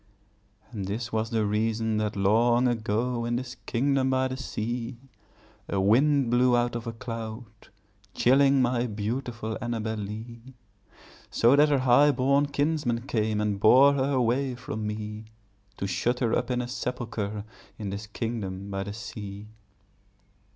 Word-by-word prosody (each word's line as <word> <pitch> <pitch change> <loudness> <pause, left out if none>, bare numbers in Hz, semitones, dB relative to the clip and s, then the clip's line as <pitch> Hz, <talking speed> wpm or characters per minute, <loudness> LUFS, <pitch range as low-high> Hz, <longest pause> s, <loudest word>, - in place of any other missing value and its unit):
And 105 -5 -5
this 115 +3 -4
was 110 0 0
the 110 -2 0
reason 110 +1 0
that, 105 -1 -1
long 115 +5 +3
ago, 115 +1 -1
In 120 0 -1
this 125 0 -4
kingdom 135 +2 +1
by 130 0 +1
the 130 - -3
sea, 120 -1 -4 0.7
A 100 - 0
wind 130 +6 +3
blew 125 0 +4
out 120 0 0
of 120 0 -5
a - - -2
cloud, 115 -1 -6 0.7
chilling 135 +1 +4
My 120 0 +1
beautiful 110 +1 -4
Annabel 115 -2 -2
Lee; 115 +5 -8 0.7
So 120 +4 +4
that 150 +1 +5
her 145 - +3
highborn 140 +2 +4
kinsmen 140 -4 0
came 110 -4 0
And 105 -2 -1
bore 130 +7 +7
her 140 0 0
away 130 +1 +1
from 125 -4 -5
me, 105 0 -5 0.5
To - - -3
shut 120 +5 0
her 120 -3 +1
up 125 0 -1
in 125 -1 0
a - - -5
sepulchre 110 -5 -4 0.3
In 105 -3 -5
this 100 +2 -6
kingdom 100 -4 -4
by 95 0 -2
the 100 - -5
sea. 105 -2 -8
115 Hz, 150 wpm, -27 LUFS, 110-130 Hz, 0.7 s, bore